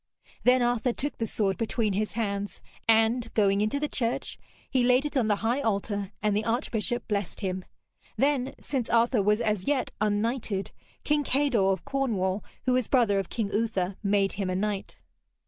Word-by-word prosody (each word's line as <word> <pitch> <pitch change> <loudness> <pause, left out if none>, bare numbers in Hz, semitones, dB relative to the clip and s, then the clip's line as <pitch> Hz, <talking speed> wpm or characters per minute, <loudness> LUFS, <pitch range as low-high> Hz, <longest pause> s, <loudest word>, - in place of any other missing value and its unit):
Then 250 0 +5
Arthur 240 0 +1
took 290 +4 -3
the 225 - 0
sword 195 -3 0
between 225 -2 0
his 210 +2 -1
hands 205 -3 -2 0.3
and, 225 +1 +3
going 200 -2 +3
into 215 +7 0
the 300 - 0
church, 235 -4 -2 0.3
he 255 -2 +1
laid 250 +3 +4
it 295 - -3
on 250 -5 +2
the 210 - +3
high 245 +5 +1
altar, 200 -3 -1
and 210 -1 +2
the 210 - +1
archbishop 240 0 -1
blessed 205 -2 -2
him. 185 -1 -2 0.5
Then, 275 -2 +1
since 260 -5 -3
Arthur 235 0 +3
was 210 +3 +2
as 210 -4 -1
yet 280 -3 +1
unknighted, 215 -1 0 0.3
King 295 -1 +2
Kador 260 -9 +2
of 190 - -3
Cornwall, 205 -8 0 0.2
who 255 - +3
was 255 -3 +1
brother 230 -7 +3
of 195 - -4
King 215 -3 -2
Uther, 200 -4 0
made 200 -1 +2
him 195 -2 -2
a 185 - -1
knight. 200 0 -2
220 Hz, 180 wpm, -27 LUFS, 200-250 Hz, 0.5 s, Then